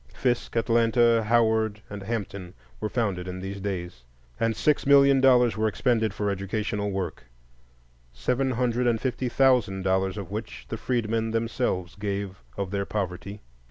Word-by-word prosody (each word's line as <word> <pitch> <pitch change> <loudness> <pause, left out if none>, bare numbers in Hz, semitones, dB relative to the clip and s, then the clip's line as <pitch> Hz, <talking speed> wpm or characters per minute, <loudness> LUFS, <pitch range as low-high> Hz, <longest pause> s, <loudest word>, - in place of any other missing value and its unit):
Fisk, 120 -2 -1
Atlanta, 115 0 +3
Howard, 110 -2 +2
and 100 0 -7
Hampton 100 -4 -5 0.2
were 105 - -2
founded 100 -7 -1
in 90 0 -5
these 95 +1 -5
days, 90 -9 -4 0.4
and 115 -1 +1
six 150 +2 +1
million 140 -1 +6
dollars 125 -4 +5
were 110 0 +1
expended 110 0 +1
for 105 0 -1
educational 105 +1 -2
work, 95 -8 -4 0.9
seven 125 - 0
hundred 125 0 0
and 115 -2 +2
fifty 130 0 -2
thousand 120 -7 +3
dollars 95 +1 +1
of 100 -2 -6
which 105 +1 -6
the 115 - -3
freedmen 115 -2 -1
themselves 115 -5 -1
gave 100 -1 -4 0.2
of 95 -2 -3
their 100 -1 -1
poverty. 100 0 -4
110 Hz, 150 wpm, -26 LUFS, 95-120 Hz, 0.9 s, million